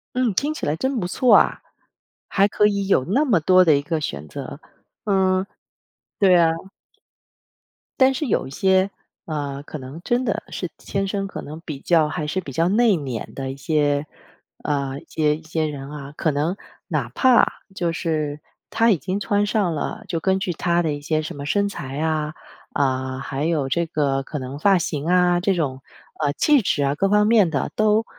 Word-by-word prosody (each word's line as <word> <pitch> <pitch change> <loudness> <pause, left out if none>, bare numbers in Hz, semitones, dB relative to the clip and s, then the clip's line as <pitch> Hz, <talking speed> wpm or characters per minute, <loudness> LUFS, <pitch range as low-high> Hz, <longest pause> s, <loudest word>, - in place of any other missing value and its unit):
嗯， 250 -2 +2
听 295 +7 0
起 - - -5
来 150 - +1
真 260 +8 -1
不 175 - -2
错 250 +7 +4
啊， - - +4 0.7
还 200 -1 +3
可 210 +1 +3
以 200 -1 -1
有 135 - +3
那 260 - +2
么 220 - +3
多 185 +3 +5
的 155 -3 +5
一 - - -1
个 160 +2 -2
选 75 - -4
择。 - - -7 0.5
嗯， 190 -2 +2 0.8
对 185 -3 +6
啊。 165 -1 +4 1.5
但 265 0 +5
是 285 +4 -2
有 235 - 0
一 - - -10
些， 190 +5 +2 0.4
呃， 145 -3 -4
可 155 - -7
能 135 +4 -9
真 245 +4 0
的 - - -1
是 - - -4
天 195 0 -3
生 195 0 -2
可 - - -7
能 155 +2 -8
比 150 -5 -7
较 160 0 +3
还 155 - -3
是 185 +5 -1
比 145 - -8
较 165 +6 +1
内敛 185 - +1
的 135 -1 -4
一 135 - -9
些 145 0 +1 0.6
呃， 140 -2 -2
一 - - -18
些 150 -1 +1
一 160 - -16
些 160 0 -1
人 140 -2 -6
啊， 145 -1 -8
可 155 - 0
能 150 +6 -1 0.3
哪 - - -1
怕 255 -3 +5 0.3
就 175 -3 0
是 155 -3 -2 0.3
他 225 +1 +3
已 195 - +3
经 185 +7 -3
穿 205 0 +1
上 205 -5 0
了， 220 +8 -4
就 165 - -2
根 190 +3 +1
据 190 -2 -2
他 170 +1 +1
的 160 -3 0
一 145 - -6
些 155 +1 0
什 155 - -6
么 140 0 -6
身 200 +7 +1
材 145 -7 -6
啊， 155 -1 -1 0.4
啊， 130 -1 -1
还 140 +1 -3
有 155 -5 0
这 170 +4 +1
个 140 -4 0
可 150 +2 -5
能 130 +2 -6
发 195 +5 +4
型 150 -3 -3
啊， 180 0 +3
这 195 +2 +1
种， 140 -7 -2 0.4
呃， 145 -2 +1
气 290 - +4
质 145 -6 0
啊 140 +1 +1
各 195 +6 +1
方 210 +1 +4
面 215 -7 +4
的， 140 - -1
都， 215 +1 +3
165 Hz, 215 characters per minute, -22 LUFS, 145-195 Hz, 1.5 s, 对